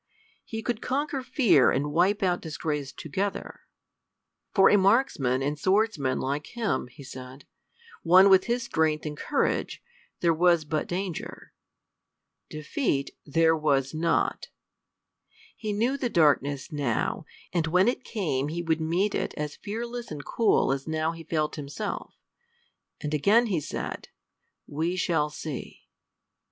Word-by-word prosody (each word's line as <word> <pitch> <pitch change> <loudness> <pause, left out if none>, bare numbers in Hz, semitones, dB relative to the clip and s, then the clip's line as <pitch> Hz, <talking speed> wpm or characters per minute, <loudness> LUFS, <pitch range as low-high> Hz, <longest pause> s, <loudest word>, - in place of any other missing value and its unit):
He 225 0 -6
could 240 - -2
conquer 280 +1 -1
fear 240 - +4
and 145 +2 0
wipe 190 +6 +2
out 180 -2 +1
disgrace 150 -3 -3
together. 190 +6 -4 0.9
For 195 -2 +6
a - - +6
marksman 190 - +2
and 145 +2 -2
swordsman 185 -8 +1
like 145 +3 -2
him, 205 - -1
he 125 +3 -13
said, 130 +1 -10 0.6
one 185 +3 +7
with 190 -1 +6
his 240 +1 0
strength 160 -8 0
and 150 -1 -4
courage, - - -1 0.4
there 170 -1 +3
was 170 -1 +3
but 155 0 -2
danger. 180 -2 -5 1.0
Defeat 155 - -2 0.2
there 160 +2 +3
was 140 -3 +1
not. 165 +1 0 1.1
He 215 -2 -4
knew 235 +7 0
the 255 -3 -1
darkness 145 - +2
now, 140 -7 -1 0.3
and 165 -2 +1
when 180 +5 +3
it 250 +1 0
came 155 - -2
he 170 +3 -3
would 160 -1 0
meet 175 +6 +1
it - - -2
as 150 0 -4
fearless 235 +3 -5
and 145 -2 -7
cool 225 - +2
as 135 +2 -3
now 160 0 0
he 165 0 -9
felt 155 -2 -1
himself. 140 -1 -5 0.9
And 150 0 -3
again 205 - +4
he 190 -8 0
said, - - -5 0.6
"We 160 +5 -2
shall 165 -4 +1
see!" 150 -2 -7
165 Hz, 140 wpm, -27 LUFS, 150-200 Hz, 1.1 s, one